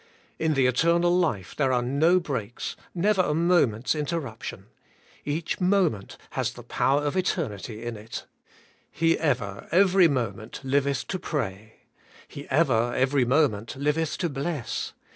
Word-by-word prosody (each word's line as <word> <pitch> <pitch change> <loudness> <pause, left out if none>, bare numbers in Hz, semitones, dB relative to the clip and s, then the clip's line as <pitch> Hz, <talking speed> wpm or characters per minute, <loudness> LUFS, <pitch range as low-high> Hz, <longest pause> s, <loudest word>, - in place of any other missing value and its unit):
In 160 -1 +1
the 135 -1 +3
eternal 170 +7 +3
life 155 - 0
there 135 -3 +1
are 125 -1 +2
no 155 +8 +3
breaks, 125 - -4 0.2
never 195 +2 +3
a 150 -4 0
moment's 160 -9 +2
interruption; 150 -6 -4 0.6
each 150 +3 -2
moment 180 - +1
has - - -1
the - - -11
power 140 +2 +1
of 145 +2 -1
eternity 120 - -2
in 120 -1 -4
it. 110 +2 -7 0.7
He 165 0 +2
ever, 120 -11 -1
every 185 0 +5
moment, 115 -7 -3
liveth 140 0 0
to 185 - -2
pray. 110 - -4 0.5
He 140 - -10
ever, 120 -5 +2
every 130 0 +2
moment, 120 -5 +1
liveth 150 +3 0
to 175 - -1
bless. 140 -1 -3
140 Hz, 140 wpm, -26 LUFS, 120-165 Hz, 0.7 s, every